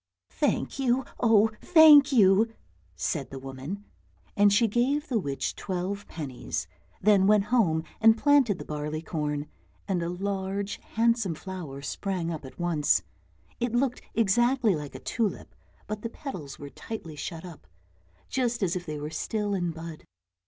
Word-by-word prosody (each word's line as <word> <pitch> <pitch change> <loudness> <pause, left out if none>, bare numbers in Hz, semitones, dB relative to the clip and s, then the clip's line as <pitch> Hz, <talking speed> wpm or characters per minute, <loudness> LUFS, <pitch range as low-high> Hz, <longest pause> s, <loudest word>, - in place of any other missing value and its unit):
"Thank 290 -1 -1
you, 260 0 +1
oh, 225 -2 +4
thank 305 -4 +8
you!" 215 -2 +5 0.4
said 135 - -2
the 135 - -7
woman, 135 +10 -7 0.5
and 205 0 +5
she 225 +3 +4
gave 265 +8 +1
the 240 -4 +1
witch 140 -7 -3
twelve 190 +2 -4
pennies, 135 - -5 0.4
then 200 -2 +5
went 210 -1 +5
home 165 -10 +3 0.2
and 225 0 +6
planted 275 -7 +4
the - - -8
barleycorn, 150 0 -3 0.4
and 185 -3 0
a 170 - -2
large, 195 +2 -3 0.2
handsome 230 -6 +2
flower 155 -7 -7
sprang 180 +2 -3
up 155 -4 -6
at 130 - -12
once; 170 -4 +2 0.6
it 240 -1 -1
looked 250 0 0
exactly 235 0 +3
like 150 -2 -7
a - - -6
tulip, 220 -5 -2 0.3
but 215 0 -5
the 230 - -4
petals 180 - -7
were 145 -1 -9
tightly 170 -9 -7
shut 160 +3 -6
up, 165 - -12 0.6
just 240 -4 -1
as 175 -2 0
if 180 -1 -5
they 150 -1 -4
were 150 +1 -5
still 210 +4 -2
in 175 -3 0
bud. 160 -1 -8
195 Hz, 150 wpm, -27 LUFS, 160-230 Hz, 0.6 s, thank